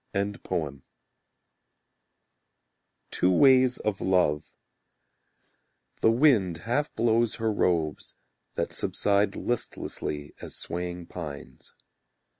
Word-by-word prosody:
Two 90 - +2
Ways 130 +2 +5
of 105 -3 -3
Love 90 -6 +1 1.4
The - - +5
wind 115 - +3
half 135 +6 0
blows 115 -1 +2
her 110 -1 -1
robes, 85 -6 -1 0.4
That - - -2
subside 100 0 +1
Listlessly 75 -10 -3
As - - -4
swaying 90 0 -4
pines. 70 -7 -9
100 Hz, 75 wpm, -27 LUFS, 85-115 Hz, 1.4 s, Ways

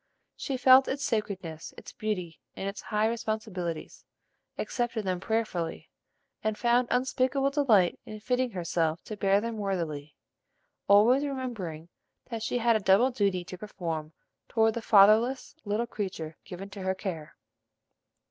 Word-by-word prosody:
She 270 - -3
felt 260 +1 +7
its 275 +1 -2
sacredness, 190 -7 -3
its - - -11
beauty, 180 -7 -3 0.2
and 195 - -4
its 200 - -5
high 210 0 0
responsibilities; 215 -7 -4 0.5
accepted 240 -4 -2
them 185 -1 -1
prayerfully, 205 -5 -2 0.5
and 215 -1 -1
found 240 +1 +3
unspeakable 260 +2 +1
delight 225 - +3
in 215 - -9
fitting 250 +3 0
herself 170 -4 -1
to 215 - -6
bear 195 -1 +3
them 230 +1 -4
worthily, 165 -8 -3 0.7
always 230 +7 +6
remembering 225 - -4 0.4
that 230 -1 -3
she 245 - -1
had 235 -1 +3
a - - +3
double 200 +6 +4
duty 200 -6 0
to 180 0 -9
perform 165 -6 -5 0.4
toward 225 -1 +3
the 235 - -4
fatherless 220 +5 +5
little 210 +3 0
creature 185 -8 -5
given 195 +2 -8
to 195 0 -8
her 190 0 0
care. 165 -5 -6
210 Hz, 140 wpm, -28 LUFS, 180-235 Hz, 0.7 s, felt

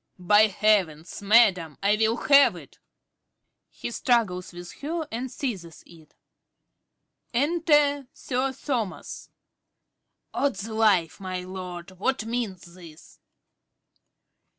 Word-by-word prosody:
_) 180 - -14
By 210 +2 +6
heavens, 190 -7 0
madam, 195 -7 +4
I 205 +1 +4
will 220 +2 +1
have 280 -1 +6
it! - - -14 0.9
(He - - -7
struggles 220 -8 0
with 175 0 -10
her 320 +2 -3
and 245 +3 -4
seizes 190 - -6
it.) 160 -3 -18 1.2
Enter 295 -1 +2
Sir 260 +1 -2
Thomas. 265 - -16
~Sir - - -21
Thomas~. 235 -9 -4 1.0
Odds 225 -8 -1
life, 215 -7 +2
my 185 -1 -5
lord, 180 -1 -8
what 260 +1 -1
means 215 -7 -4
this? 165 -3 -15
215 Hz, 110 wpm, -25 LUFS, 180-255 Hz, 1.2 s, By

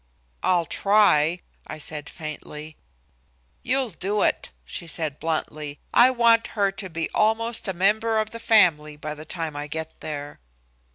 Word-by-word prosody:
"I'll 175 -2 +2
try," 180 -4 +3 0.3
I - - -6
said 150 0 -5
faintly. 155 -1 -8 0.9
"You'll 260 -2 0
do 200 +4 -1
it," - - 0 0.2
she 170 - -6
returned 155 -3 0
bluntly. 155 -2 -3 0.2
"I 245 - +7
want 235 -2 +4
her 200 -1 +3
to 195 -1 -6
be 165 -1 -2
almost 225 +1 +2
a 190 - -1
member 215 +5 +2
of 215 0 -1
the 230 - -7
family 165 -10 +3
by 150 0 -5
the 155 +1 -10
time 160 -2 -4
I 145 0 -4
get 160 +1 -6
there." 145 -1 -6
170 Hz, 155 wpm, -24 LUFS, 155-215 Hz, 0.9 s, I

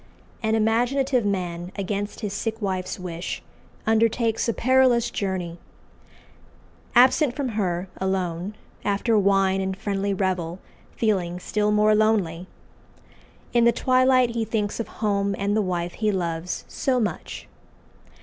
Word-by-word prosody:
An 220 -1 +1
imaginative 245 +3 +2
man, 175 -2 -3
against 205 +2 -3
his 205 -3 -3
sick 225 +2 -3
wife's 190 -3 -3
wish, 175 -1 -5 0.4
undertakes 225 +1 +2
a - - +4
perilous 255 -1 +3
journey. 180 -4 -3 1.4
Absent 255 +2 +5
from 280 -3 -2
her 190 -4 -1
alone 190 0 -2 0.3
after 205 +3 +1
wine 195 -1 +3
and 190 0 -2
friendly 200 -1 -1
revel 185 -3 -1 0.4
feeling 180 -6 0
still 210 +3 0
more 210 0 +4
lonely 200 -6 +1 1.1
in 235 -1 +4
the 235 - +6
twilight 255 0 +3
he 230 -1 -1
thinks 215 -1 -2
of 230 - -2
home 200 -2 -1
and 200 +1 0
the 215 - +3
wife 175 -2 -2
he 215 -1 0
loves 170 -2 -3
so 255 -2 0
much. 205 -9 -4
205 Hz, 130 wpm, -24 LUFS, 185-230 Hz, 1.4 s, the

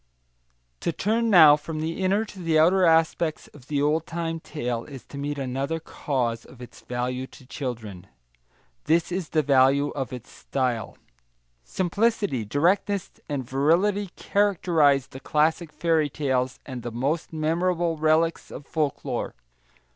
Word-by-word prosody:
To - - -1
turn 225 +6 0
now 160 -7 +9
from 155 +1 -6
the 165 +4 -3
inner 200 +4 +2
to 205 -2 -12
the 165 -3 +1
outer 180 +4 +5
aspects 160 0 +1
of 140 -3 -17
the 145 -1 0
old 155 +2 +1
time 165 -1 -3
tale 120 -7 -4
is 135 -4 -11
to 140 - -10
meet 145 +1 -3
another 135 +4 -2
cause 125 -7 -2
of 125 - -16
its 125 - -12
value 125 +1 -3
to 130 - -16
children. 110 - -6 0.8
This 165 +3 +2
is 180 -2 -3
the 155 -1 +1
value 140 +1 +4
of 135 -2 -4
its 125 -2 -9
style. 125 -5 -3 0.7
Simplicity, 190 - 0
directness, 180 - +1 0.2
and 135 -4 -3
virility 175 +10 +2
characterise 165 -9 +2
the 135 - -9
classic 155 +3 +1
fairy 160 -2 +1
tales 130 -3 -1
and 130 -3 -6
the 120 - -4
most 140 +8 -2
memorable 165 +2 0
relics 160 +2 +1
of 140 - -9
folklore. 150 -3 -2
150 Hz, 145 wpm, -25 LUFS, 130-170 Hz, 0.8 s, now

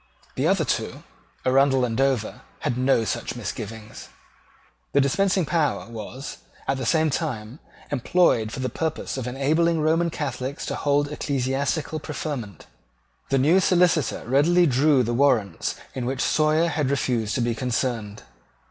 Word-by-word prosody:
The - - 0
other - - +2
two, - - -2 0.4
Arundell 135 0 +4
and 115 -2 -3
Dover, 135 -4 0 0.2
had 120 - -1
no 130 -2 +2
such - - -3
misgivings. 110 -1 -7 0.8
The 140 - +4
dispensing 185 +6 +2
power 155 -4 0
was, 115 +5 -7 0.3
at 135 - +1
the 130 -3 -3
same 160 +1 +3
time, 125 -4 -3 0.3
employed 130 -5 +2
for 130 - -5
the 130 - 0
purpose 160 -1 -3
of 130 -2 -4
enabling 155 +6 +1
Roman 165 +2 +2
Catholics 135 -3 -4
to - - -3
hold 145 0 +1
ecclesiastical 140 +3 -1
preferment. 140 - -5 0.6
The 135 - +2
new 155 +8 +4
Solicitor 180 -5 +2
readily 165 +7 +4
drew 140 -1 +3
the 120 +1 -1
warrants 120 -6 +1 0.2
in 125 -2 -3
which 135 +1 -2
Sawyer 155 +2 +2
had 150 -4 -1
refused 120 -5 0
to 130 - 0
be 120 0 +1
concerned. 115 -3 -2
135 Hz, 145 wpm, -24 LUFS, 120-155 Hz, 0.8 s, Arundell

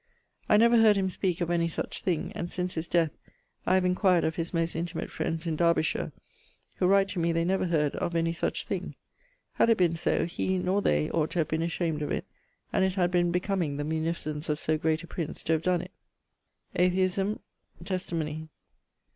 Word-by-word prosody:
I 210 - +6
never 235 +2 +6
heard 220 -2 +6
him 190 -1 0
speake 180 -2 -1
of 170 0 0
any 170 -1 +2
such 165 - -4
thing; 175 -4 -1
and, 170 - -4
since 180 +1 -3
his 160 -1 -4
death, 165 -3 +2 0.6
I - - +4
have 185 -1 +3
inquired 180 -1 +3
of 160 - 0
his 165 0 -3
most 165 -1 -1
intimate 165 0 -3
friends 165 +1 -3
in 165 -2 -1
Derbyshire, 170 -1 +1 0.7
who 180 - +2
write 195 +1 +4
to 195 - -3
me 170 0 +2
they 165 0 +1
never 185 0 +1
heard 150 -4 +1
of 170 - -2
any 165 0 +1
such 170 - -2
thing. - - -4 0.6
Had - - +3
it 225 - +5
been 175 -2 +3
so, 165 0 +1
he, 185 +2 -1
nor 185 +2 +1
they, 75 - +1
ought 155 -1 +1
to - - -5
have 155 - -1
been 160 +1 0
ashamed 165 -2 -1
of 150 - -2
it, - - -2 0.5
and - - +3
it 190 -1 +1
had 180 -2 +2
been 175 -1 +3
becoming 180 -5 -1
the 145 - -2
munificence 155 -1 -2
of 150 - +1
so 155 - +1
great 155 +1 0
a - - -10
prince 160 -1 -4
to 160 - +1
have 160 - +1
donne 180 0 +1
it. - - -11 0.8
Atheisme. 185 +3 +2 0.5
Testimonie. 160 -5 -3
170 Hz, 205 wpm, -28 LUFS, 160-185 Hz, 0.8 s, I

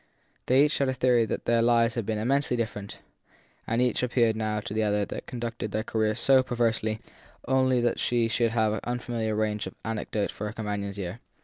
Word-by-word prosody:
They 130 +3 +5
had 140 -3 0
a 130 - -1
theory 125 -2 +3
that - - -3
their 115 -1 +3
lives 115 0 +3
had 115 -4 -3
been 110 -1 0
immensely 125 +3 +1
different, 105 -3 -4 0.7
and 115 +1 0
each 125 -2 +2
appeared 120 -3 +2
now 110 -1 -1
to 105 - -6
the 110 - 0
other 105 -1 +1
to - - -7
have - - -8
conducted 115 -3 -4
her 110 - 0
career 110 -1 0
so 135 +2 +5
perversely 115 -3 0 0.5
only 130 -1 +3
that 120 0 0
she 120 -1 +1
should 115 +1 +1
have 110 -2 +1
an 110 - -2
unfamiliar 120 -3 -2
range 105 -2 -1
of 95 - -9
anecdote 110 -2 -2
for 105 - -5
her 105 - -6
companion 105 -2 -3
s 100 - -8
ear. 95 +3 -5
115 Hz, 210 wpm, -27 LUFS, 110-120 Hz, 0.7 s, They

